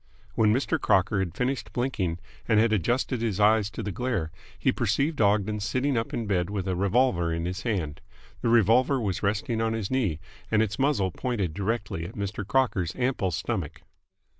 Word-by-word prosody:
When 110 -1 +3
Mr. 140 +6 0
Crocker 95 +2 +2
had 90 -4 -2
finished 125 -2 -2
blinking 105 -10 -1 0.3
and 110 -2 +4
had 110 0 +3
adjusted 120 - 0
his 110 -5 -1
eyes 105 0 +4
to 110 - -6
the 105 - -3
glare, 110 -8 -2 0.3
he - - +2
perceived 145 -1 0
Ogden 105 +1 +2
sitting 130 +7 0
up 115 -1 -1
in 115 - -2
bed 90 -3 0
with 100 -2 -3
a 95 - 0
revolver 95 -3 +2
in 85 +1 -2
his 90 +3 -3
hand. 85 -11 -2 0.4
The - - +1
revolver 120 +4 +4
was 100 -6 -2
resting 110 +3 0
on 115 0 0
his 110 -4 -3
knee, 105 -12 0 0.3
and 110 0 +3
its 110 +3 -4
muzzle 135 -10 +2
pointed 100 -7 -2
directly 100 -3 -2
at 100 - -11
Mr. 100 0 -3
Crocker's 105 -9 +1
ample 125 -6 0
stomach. 90 -1 -3
105 Hz, 185 wpm, -27 LUFS, 95-120 Hz, 0.4 s, and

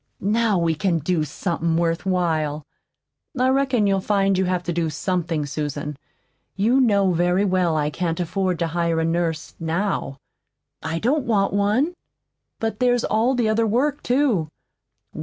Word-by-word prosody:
"Now 215 0 +2
we 170 -1 +1
can 170 +2 0
do 160 +1 0
somethin' 165 +1 -2
worthwhile." 165 -3 0 0.7
"I 255 +1 +3
reckon 265 -4 +2
you'll 195 -1 +2
find 195 -1 +2
you 190 0 +1
have 180 -1 -1
to 175 - -2
do 165 -1 0
something, 165 -1 -2
Susan. 150 0 -4 0.6
You 230 +7 +2
know 200 -6 +3
very 180 +3 +2
well 180 -4 +1
I 150 0 0
can't 165 0 -2
afford 185 +1 -1
to 170 - -1
hire 170 -1 0
a 160 - +1
nurse 165 -1 -1
now." 165 -4 -2 0.6
"I 160 +1 -3
don't 260 - 0
want 200 -4 +1
one." 210 - +1 0.7
"But 225 +1 -2
there's 245 -1 +2
all 230 +5 +1
the 240 -3 +1
other 220 +1 +2
work, 275 +7 0
too." 245 - +1
185 Hz, 155 wpm, -22 LUFS, 165-215 Hz, 0.7 s, I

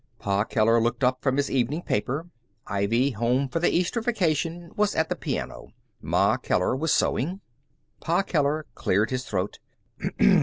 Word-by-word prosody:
Pa 100 -1 0
Keller 115 +1 +3
looked 120 +2 -1
up 130 0 +2
from 135 -1 +1
his 140 - 0
evening 135 +6 0
paper. 135 +10 -1 0.4
Ivy, 115 +7 +1
home 125 +4 +1
for 165 - -2
the 175 - +3
Easter 180 +7 0
vacation, 170 - -1
was 210 0 +1
at 160 0 +1
the - - 0
piano. - - -4 0.3
Ma - - +2
Keller 90 +7 0
was 160 +4 0
sewing. 175 +10 +1 0.6
Pa 170 +4 +1
Keller 155 -3 0
cleared 105 +6 +1
his 130 0 -2
throat. 95 0 -3
135 Hz, 155 wpm, -26 LUFS, 115-165 Hz, 0.6 s, Keller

